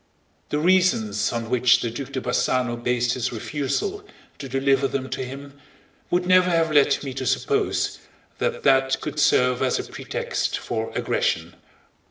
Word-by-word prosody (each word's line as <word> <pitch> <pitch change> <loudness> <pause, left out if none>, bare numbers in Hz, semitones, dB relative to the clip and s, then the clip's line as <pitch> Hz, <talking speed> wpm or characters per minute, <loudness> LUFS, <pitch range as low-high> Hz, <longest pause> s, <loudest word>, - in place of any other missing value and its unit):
The 150 - -1
reasons 150 - +2
on 115 -1 -3
which 125 0 +4
the 115 - -2
Duc 135 +3 -6
de 130 - -1
Bassano 125 -1 0
based 120 0 0
his 125 - -2
refusal 145 - -3 0.4
to 135 - -7
deliver 135 +1 +2
them 135 -1 -4
to - - -3
him 140 +2 -9 0.5
would 180 0 +1
never 185 0 +5
have 165 -2 +2
led 145 -1 +3
me 135 -2 -5
to 130 0 -4
suppose - - 0 0.4
that - - -2
that 135 0 +3
could 150 - -5
serve 125 -3 +3
as - - +1
a - - -3
pretext 485 -1 -3
for - - -4
aggression. 485 0 -1
135 Hz, 160 wpm, -23 LUFS, 125-155 Hz, 0.5 s, never